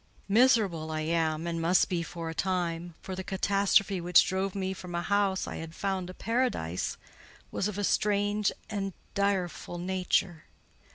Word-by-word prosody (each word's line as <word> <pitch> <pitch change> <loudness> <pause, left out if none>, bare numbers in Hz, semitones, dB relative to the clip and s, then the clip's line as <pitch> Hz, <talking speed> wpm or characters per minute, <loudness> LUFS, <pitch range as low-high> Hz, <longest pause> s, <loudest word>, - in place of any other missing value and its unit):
Miserable 205 - +3
I 155 0 -2
am, 160 0 0
and 165 -1 -2
must 175 +3 +4
be 180 -3 -1
for 165 0 -6
a 160 - -3
time; 175 -2 -2
for 190 - -5
the 190 - -4
catastrophe 200 0 +2
which 175 0 +6
drove 190 0 -1
me 190 -1 -1
from 180 -2 -7
a 175 - -1
house 200 -1 +1
I - - -5
had 165 0 -7
found 190 -2 -2
a 185 - -8
paradise 225 - -1 0.5
was 195 - 0
of 210 -2 -4
a 205 - -1
strange 205 0 +2 0.2
and 200 -3 -3 0.2
direful 195 -3 -1
nature. 180 -2 0
185 Hz, 165 wpm, -29 LUFS, 170-200 Hz, 0.5 s, which